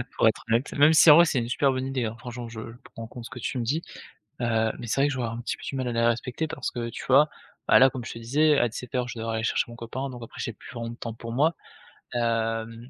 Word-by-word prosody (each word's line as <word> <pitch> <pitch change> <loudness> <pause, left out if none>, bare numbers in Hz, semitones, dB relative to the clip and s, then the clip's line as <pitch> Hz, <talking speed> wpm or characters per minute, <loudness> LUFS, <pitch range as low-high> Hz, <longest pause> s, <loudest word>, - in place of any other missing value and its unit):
pour - - +4
être - - +1
honnête, 115 +5 +1
même 145 +2 +6
si 160 - +7
en 150 - +11
vrai 170 +2 +8
c'est 145 -5 +1
une 115 0 -3
super 135 +2 +2
bonne 130 0 -2
idée, 130 -3 -1
hein, 110 0 -4
franchement 120 -1 -7
je 115 -1 -8 0.3
prends 115 0 -7
compte 120 0 -10
ce - - -8
que 130 - -8
tu 130 - -3
me 120 - -1
dis, 145 +8 0 0.6
heu, 115 -2 +1
mais 120 - -6
c'est 135 - +1
vrai 140 - +4
que - - -2
j'aurais 125 -3 -2
un 115 +1 -5
petit 120 - -3
peu - - -14
du - - -4
mal 130 -2 -2
à 120 - -2
les 115 - +1
respecter 120 +6 0
parce - - -4
que, 120 -1 -4
tu - - -7
vois? 140 +4 +6 0.4
Bah - - +7
là, 135 +1 +7
comme 130 -2 -7
je - - -6
te 115 - -8
disais, 145 +6 +3
à 120 - +2
17:00 125 +2 -3
je 125 - -7
devrais 115 0 -2
aller 110 - -3
chercher - - +1
mon 120 - -9
copain 130 +4 -5
donc 125 -1 -9
après 115 - -11
j'ai 115 - -3
plus - - -13
vraiment 115 -1 -5
de - - -8
temps 115 -1 -6
pour 115 0 -7
moi, 155 +6 +2 0.6
hem 115 0 -1
120 Hz, 300 wpm, -26 LUFS, 115-135 Hz, 0.6 s, en